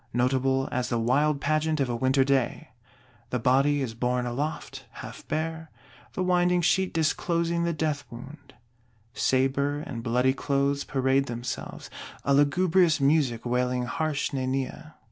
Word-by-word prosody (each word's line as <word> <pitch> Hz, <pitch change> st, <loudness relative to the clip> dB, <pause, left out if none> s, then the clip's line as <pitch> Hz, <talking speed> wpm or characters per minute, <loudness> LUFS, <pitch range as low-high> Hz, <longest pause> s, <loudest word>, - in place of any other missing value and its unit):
Notable 130 Hz, +2 st, +1 dB
as 125 Hz, 0 st, -1 dB
the 120 Hz, -, 0 dB
wild 140 Hz, +6 st, +2 dB
pageant 155 Hz, +1 st, 0 dB
of 135 Hz, -, +1 dB
a 120 Hz, -, -2 dB
winter 130 Hz, +3 st, +2 dB
day. 135 Hz, +2 st, 0 dB, 0.6 s
The 125 Hz, -, -1 dB
Body 135 Hz, +4 st, +2 dB
is 115 Hz, -3 st, -4 dB
borne 125 Hz, +1 st, -1 dB
aloft, 145 Hz, +6 st, -4 dB
half -, -, -10 dB
bare; 160 Hz, 0 st, -3 dB, 0.4 s
the 185 Hz, -, -1 dB
winding 180 Hz, -1 st, +2 dB
sheet 190 Hz, +2 st, +2 dB
disclosing 170 Hz, +1 st, 0 dB
the 170 Hz, -, +1 dB
death 150 Hz, -2 st, -2 dB
wound; 140 Hz, +5 st, -12 dB, 0.6 s
sabre 135 Hz, +2 st, +1 dB
and 120 Hz, -6 st, -6 dB
bloody 125 Hz, +3 st, +2 dB
clothes 140 Hz, 0 st, 0 dB
parade 135 Hz, 0 st, +1 dB
themselves; 120 Hz, +1 st, -6 dB, 0.3 s
a 140 Hz, -, +3 dB
"lugubrious 165 Hz, +3 st, +3 dB
music" 135 Hz, -5 st, +2 dB
wailing 125 Hz, +1 st, 0 dB
harsh 150 Hz, +3 st, -2 dB
næniæ. 135 Hz, +3 st, -3 dB
140 Hz, 140 wpm, -27 LUFS, 125-155 Hz, 0.6 s, a